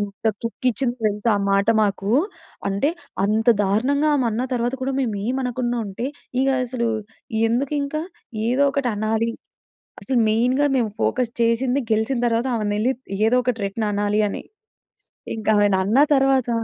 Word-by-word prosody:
ఎంత 205 +1 -4 0.2
కిక్కిచ్చిందో 245 +1 -1
తెలుసా 210 +2 0
ఆ - - -2
మాట 200 +3 +3
మాకూ. 200 -1 0 0.6
అంటే, 200 +8 +1 0.4
అంత 220 +3 +1 0.2
దారుణంగా 265 +10 +1
ఆమన్న 235 -3 0
తర్వాత 245 +1 0
కూడా 270 - -1
మేము 235 -5 -1
ఏమనకుండా 250 -1 -1
ఉంటే, 220 +6 -4 0.3
ఇగా 270 0 +2
అసలూ 240 -1 -2 0.6
ఎందుకింక? 280 +4 -1 0.5
ఏదో 255 +4 +2
ఒకటి 275 -4 0
అనాలి. 220 +2 0 0.7
అసలు 260 -2 0
మెయిన్‌గా 250 +6 +2
మేము 235 -4 +1
ఫోకస్ 245 -2 0
చేసింది 245 +4 +2
గెలిచిన 220 +4 +1
తరవాత 235 +2 +1
ఆమను 210 -2 -1
యెళ్లి 240 +5 +2 0.3
ఏదో 245 +3 +3
ఒకటి 250 -2 0
రిటన్ 210 +2 -2
అనాలీ 205 +1 +1
అని. - - -5 0.9
ఇంకా 220 0 -1
ఆమెని 205 -2 +3
అన్నా 215 +8 +3
తరవాత 270 -2 +3
235 Hz, 140 wpm, -22 LUFS, 215-260 Hz, 0.9 s, మాట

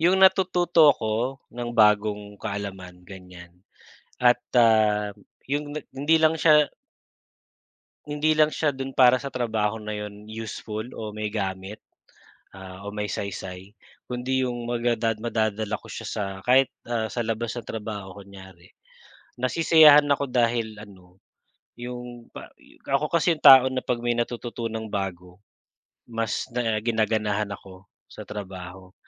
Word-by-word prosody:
yung 180 +3 +4
natututo 180 -4 +4
ako 120 +1 0 0.2
ng 120 0 -5
bagong 105 -1 +2
kaalaman 95 -4 -6
ganyan 90 -1 -13 0.6
at, 125 0 +4 0.2
ah, 105 -3 +3 0.3
yung 145 +2 -2 0.2
hindi 150 +4 +3
lang 160 0 +4
siya 150 -2 +5 1.4
hindi 150 +1 0
lang 155 0 +4
siya 155 - +1
do'n 135 -1 -6
para 130 -1 +6
sa 140 +1 -7
trabaho 110 -3 -1
na 105 0 -5
yun 105 0 -8
useful 110 0 -6
o 110 -1 -6
may 105 0 -5
gamit, 95 0 -4 0.8
ah, 95 0 -10
o - - -4
may 105 0 -3
saysay, 95 0 -6 0.3
kundi 130 +1 -1
yung 120 -2 -3
maga 120 0 0
da 115 0 0
madadala 110 -2 -1
ko - - -17
siya - - -7
sa 105 - -3 0.2
kahit, 130 +3 +4 0.2
ah, 115 -2 -1
sa 120 +2 -3
labas 115 0 -3
ng 120 - -7
trabaho 105 -3 -6
kunyari. 95 -3 -14 0.7
Nasisiyahan 150 +2 +6
ako 140 0 +1
dahil 115 -3 0
ano, 95 -3 -16 0.6
yung 120 -1 -8
pa - - -11 0.4
ako 140 +2 +1
kasi 170 +1 +2
yung - - -24
tao 135 -2 +10
na 130 -1 -3
'pag 120 -1 -1
may 120 0 +1
natututunang 115 -2 -4
bago, 90 -2 -5 0.7
mas 115 -2 -2
na 115 -3 0
ginaganahan 110 -2 0
ako 95 -1 -11 0.2
sa - - -12
trabaho. 95 -2 -9
110 Hz, 135 wpm, -25 LUFS, 100-125 Hz, 1.4 s, tao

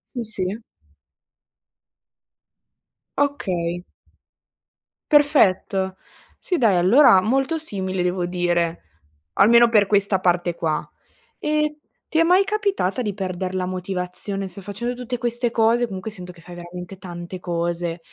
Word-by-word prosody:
Sì, 240 - -2
sì. 200 -2 -3 2.6
Okay. 180 -12 -1 1.3
Perfetto. 195 -10 +3 0.4
Sì, 360 - -1
dai, 225 - +3
allora 190 +3 +6
molto 270 - +1
simile, 190 - -3
devo 180 0 0
dire, 175 -1 0 0.5
almeno 235 +4 +6
per 210 -3 +4
questa 200 -1 +2
parte 175 -1 +1
qua. 155 -2 -2 0.5
E 300 0 0 0.3
ti 320 - 0
è - - +6
mai 365 +4 +4
capitata 400 - -1
di 210 -4 -2
perder 185 -1 -4
la 185 -1 -1
motivazione? 185 +1 -4
Se 195 +2 -10
facendo 210 +6 -4
tutte 245 0 -4
queste 240 0 -1
cose, 230 +1 +2
comunque 190 0 -6
sento 180 -4 -9
che 175 - -18
fai 175 +1 -12
veramente 175 +2 -9
tante 180 0 -8
cose, 170 -1 -2
190 Hz, 120 wpm, -22 LUFS, 180-240 Hz, 2.6 s, allora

